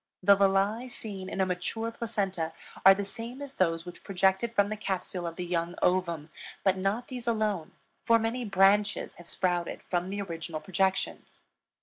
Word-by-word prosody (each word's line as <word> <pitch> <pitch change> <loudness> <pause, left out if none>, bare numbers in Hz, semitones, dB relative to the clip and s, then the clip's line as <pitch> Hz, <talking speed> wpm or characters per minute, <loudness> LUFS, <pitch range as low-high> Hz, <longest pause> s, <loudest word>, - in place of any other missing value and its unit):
The 200 +2 +8
villi 200 +5 +2
seen 195 -6 -6
in - - -5
a - - +4
mature 185 +5 -2
placenta 195 -8 -2 0.3
are 195 0 +9
the 200 0 -3
same 230 +5 -7
as 285 -1 -6
those 165 -5 +1
which 175 - -10
projected 195 +4 +1
from 205 -1 +4
the 215 - -2
capsule 190 -3 -3
of 165 - -5
the 180 - -4
young 170 0 -1
ovum, 170 -4 +1 0.3
but 190 -1 +4
not 195 +6 -1
these 245 -2 -6
alone, 215 -7 0 0.3
for 230 - +5
many 230 +2 -1
branches 200 0 +3
have 175 - -12
sprouted 175 -1 -1
from 180 0 -1
the 200 +1 -3
original 165 -4 -4
projections. 190 +2 -1
195 Hz, 175 wpm, -29 LUFS, 180-215 Hz, 0.3 s, are